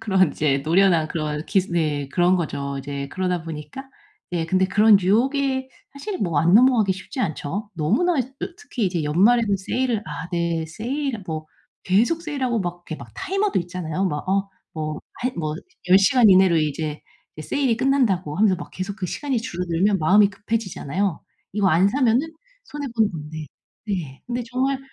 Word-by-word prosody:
그런 190 -5 +3
이제 140 -2 +1
노련한 170 -1 +3
그런 155 -1 -3
기술 190 -2 0
네 150 -4 0
그런 175 +4 +3
거죠, 140 -4 -3
이제 140 0 -5
그러다 180 -1 -2
보니까 165 - -8 0.4
예 165 -2 -1
근데 185 +2 +2
그런 205 +2 +5
유혹에 265 +7 +1 0.2
사실은 360 +8 -5
뭐 170 -5 0
안 170 +5 +4
넘어가기 230 -4 +5
쉽지 190 +9 -9
않죠. 200 - -3
너무나 245 - +1
이 - - +2
어 265 +3 -7 0.2
특히 235 - -2
이제 175 -3 -1
연말에는 200 +7 +3
세일을 235 +4 -1
아 150 +2 -6
네 170 -2 -1
세일 235 - -4
뭐 155 -1 -4 0.4
계속 240 - +2
세일하고 260 - -1
막 175 -1 -3
이렇게 155 - -5
막 - - -11
타이머도 390 - 0
있잖아요. 175 0 -3
막 150 +1 -4
어 195 +1 +1 0.2
뭐 155 -1 -4
한 250 +1 -2
뭐 155 -2 -2 0.3
'10 185 +2 +8
시간 240 +2 +5
이내로 185 -2 +6
이제 155 0 -1 0.4
이 155 - -7
세일이 260 - 0
끝난다.'고 230 - +1
하면서 205 -2 +4
막 - - -9
계속 190 +2 -5
그 185 - -3
시간이 270 - -2
줄어들면 180 0 0
마음이 200 +6 +5
급해지잖아요. 200 -5 -2 0.3
이거 200 -1 +2
안 180 +4 +4
사면은 250 0 +3 0.5
손해 290 -1 -5
보는 220 -2 +3
건데. 155 0 -7 0.4
네. 165 -10 -4
근데 245 0 -2
정말 265 +2 0
190 Hz, 350 characters per minute, -23 LUFS, 160-240 Hz, 0.5 s, 10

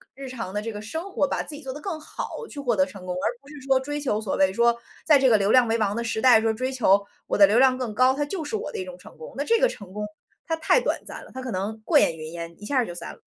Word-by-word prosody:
日 270 0 -8
常 230 -7 -5
的 210 - -1
这 225 +1 -4
个 210 - -6
生 320 - -6
活， 285 - +1
把 - - -2
自 305 - -8
己 290 - -10
做 265 -3 -6
得 295 - -8
更 350 -6 -4
好 455 +8 -7
去 290 - -8
获 245 -5 0
得 190 - +4
成 185 -1 -11
功， 180 - -3
而 180 - -1
不 275 - -21
是 300 - -11
说 265 -1 +4
追 290 +2 -4
求 255 -7 0
所 205 - -2
谓 190 -1 +4
说， 235 +1 +3 0.3
在 300 -3 +6
这 265 -1 +4
个 220 - +6
流 200 +1 +1
量 250 -2 +6
为 225 +1 +1
王 210 -1 0
的 235 - -2
时 225 -1 -2
代 245 -4 +7
说 225 0 +2
追 255 +4 -2
求 200 -6 +3 0.2
我 - - 0
的 200 - +9
流 215 +5 +3
量 260 -1 +5
更 240 -5 -3
高， 255 +2 +5
它 290 - -1
就 320 +2 -4
是 365 - -4
我 435 - -4
的 445 - -5
一 370 - -4
种 - - -9
成 - - -15
功。 475 - -9
那 285 - 0
这 460 +8 +3
个 - - +5
成 200 - -10
功， 210 0 -3 0.4
它 325 - 0
太 325 +9 +3
短 - - -1
暂 - - -8
了， - - -15
它 260 - -6
可 255 - -5
能 205 +4 -3
过 - - +4
眼 165 - +2
云 155 0 -7
烟， 170 0 -7
一 210 - -8
下 280 - 0
儿 250 - +3
就 175 - -6
散 - - -5
了。 - - -18
250 Hz, 355 characters per minute, -25 LUFS, 210-290 Hz, 0.4 s, 的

